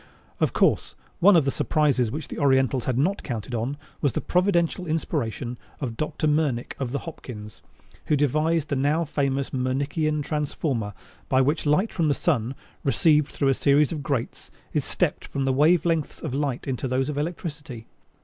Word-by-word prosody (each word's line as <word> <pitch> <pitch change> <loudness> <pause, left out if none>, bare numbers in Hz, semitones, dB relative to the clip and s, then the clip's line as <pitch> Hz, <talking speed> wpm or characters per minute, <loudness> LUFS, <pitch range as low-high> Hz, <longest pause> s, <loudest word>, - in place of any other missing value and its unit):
] - - -32
Of - - +2
course, - - +2 0.2
one 195 +2 +7
of 160 -5 +5
the 135 - +2
surprises 140 -7 +1
which 150 +5 -5
the - - -6
Orientals 130 -3 +3
had 125 -2 0
not 180 +9 +1
counted 120 -2 -5
on 120 +5 -2 0.2
was 140 -4 +1
the - - 0
providential 180 -1 +1
inspiration 130 -6 -2 0.2
of 125 -6 -3
Dr. 155 +3 -2
Mernick 150 -5 +1
of 130 -3 -2
the 140 - -1
Hopkins, 110 -10 -9 0.5
who 150 - +3
devised 155 +2 +1
the 140 - 0
now 145 +5 +1
famous 140 -2 -1
Mernickian 145 +4 0
transformer 140 - -2 0.3
by 130 - +4
which 145 +4 +1
light 185 +9 +2
from 165 -3 +1
the 145 - +2
sun, 130 -6 0 0.3
received 150 +1 +3
through 140 - 0
a - - +5
series 140 +2 +3
of 155 -3 -3
grates, 135 -4 -3 0.2
is - - +1
stepped - - -1
from 135 -1 -2
the 135 - +2
wavelengths 160 +2 +2
of 155 -6 -3
light 140 -2 -2
into 130 -1 -2
those 130 +1 0
of 145 -1 -2
electricity. 150 -6 -5
145 Hz, 180 wpm, -25 LUFS, 130-155 Hz, 0.5 s, one